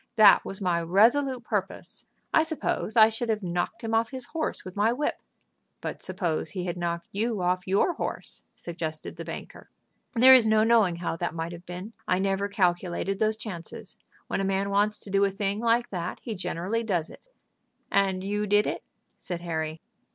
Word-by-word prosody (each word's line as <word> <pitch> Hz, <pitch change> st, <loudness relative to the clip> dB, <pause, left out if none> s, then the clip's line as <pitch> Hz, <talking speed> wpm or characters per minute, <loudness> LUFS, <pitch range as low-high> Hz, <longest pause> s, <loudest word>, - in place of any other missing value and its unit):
That 215 Hz, -3 st, +7 dB
was 195 Hz, -, -5 dB
my 180 Hz, -3 st, +1 dB
resolute 240 Hz, +9 st, +3 dB
purpose. -, -, -4 dB, 0.3 s
I -, -, +6 dB
suppose 315 Hz, -7 st, -2 dB
I 220 Hz, -1 st, +9 dB
should 225 Hz, +1 st, -3 dB
have 215 Hz, -2 st, 0 dB
knocked 180 Hz, +6 st, -2 dB
him 225 Hz, 0 st, -2 dB
off 225 Hz, 0 st, +2 dB
his 260 Hz, -2 st, -4 dB
horse 320 Hz, -2 st, -3 dB
with 185 Hz, -, -8 dB
my 210 Hz, +3 st, +3 dB
whip." 280 Hz, +5 st, -2 dB, 0.6 s
"But -, -, -5 dB
suppose 165 Hz, -4 st, -2 dB
he 185 Hz, -3 st, -4 dB
had 175 Hz, -, -2 dB
knocked 170 Hz, -1 st, -3 dB
you 220 Hz, +1 st, -1 dB
off 180 Hz, +1 st, 0 dB
your 200 Hz, -, +2 dB
horse?" -, -, -5 dB
suggested 160 Hz, -2 st, -6 dB
the -, -, -7 dB
banker. -, -, -9 dB, 0.5 s
"There 255 Hz, +3 st, +9 dB
is 245 Hz, -4 st, +7 dB
no 215 Hz, 0 st, +4 dB
knowing 220 Hz, -6 st, +4 dB
how 170 Hz, -1 st, -3 dB
that 175 Hz, 0 st, -3 dB
might 165 Hz, +1 st, -3 dB
have 175 Hz, +1 st, -10 dB
been. 180 Hz, +5 st, -7 dB
I 180 Hz, -, +2 dB
never 195 Hz, +1 st, 0 dB
calculated 185 Hz, -1 st, 0 dB
those 215 Hz, 0 st, +1 dB
chances. 190 Hz, -7 st, -8 dB, 0.3 s
When -, -, -2 dB
a -, -, -1 dB
man 195 Hz, +1 st, 0 dB
wants 205 Hz, +1 st, +2 dB
to 200 Hz, -, -10 dB
do 195 Hz, +1 st, +3 dB
a 200 Hz, -, +4 dB
thing 200 Hz, +1 st, -2 dB
like 235 Hz, +1 st, +1 dB
that 180 Hz, -2 st, -3 dB
he 230 Hz, -, -4 dB
generally 190 Hz, +3 st, -2 dB
does 180 Hz, -8 st, -1 dB
it." -, -, -14 dB, 0.7 s
"And 190 Hz, -2 st, +2 dB
you 205 Hz, +1 st, -1 dB
did 205 Hz, +1 st, +4 dB
it?" -, -, -2 dB, 0.4 s
said 175 Hz, -2 st, -5 dB
Harry. 160 Hz, -2 st, -3 dB
195 Hz, 190 wpm, -27 LUFS, 175-225 Hz, 0.7 s, I